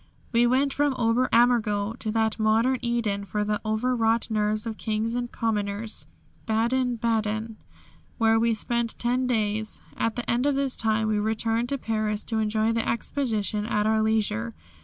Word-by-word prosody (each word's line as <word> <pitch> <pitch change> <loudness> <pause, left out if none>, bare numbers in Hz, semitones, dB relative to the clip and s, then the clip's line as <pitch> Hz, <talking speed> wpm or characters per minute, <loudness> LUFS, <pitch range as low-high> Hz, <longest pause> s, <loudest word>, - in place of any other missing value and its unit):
We 240 0 +4
went 270 +3 +2
from 290 -2 +1
Ober 240 +2 +2
Ammergau 225 -3 +3
to 220 - -3
that 220 0 0
modern 225 +4 +2
Eden 230 -4 -1
for 210 +1 -2
the 210 0 -1
overwrought 225 +1 +1
nerves 215 0 0
of 220 -2 -5
kings 220 +1 -1
and 240 0 -3
commoners 210 -1 -3 0.4
Baden 240 +3 +1
baden, 220 -1 -1 0.6
where 225 -1 +4
we 230 0 +2
spent 235 +1 -2
ten 250 +1 0
days. 215 -2 -1 0.2
At 225 -1 -1
the 245 - -4
end 245 +4 +1
of 285 - +2
this 275 -2 0
time 220 -1 +1
we 215 -1 +1
returned 225 +2 0
to 280 - 0
Paris 215 -3 -2
to 225 -1 -2
enjoy 215 +1 +1
the 230 0 0
Exposition 220 -4 -1
at 210 -2 0
our 220 0 +2
leisure. 210 - 0
225 Hz, 165 wpm, -26 LUFS, 215-240 Hz, 0.6 s, We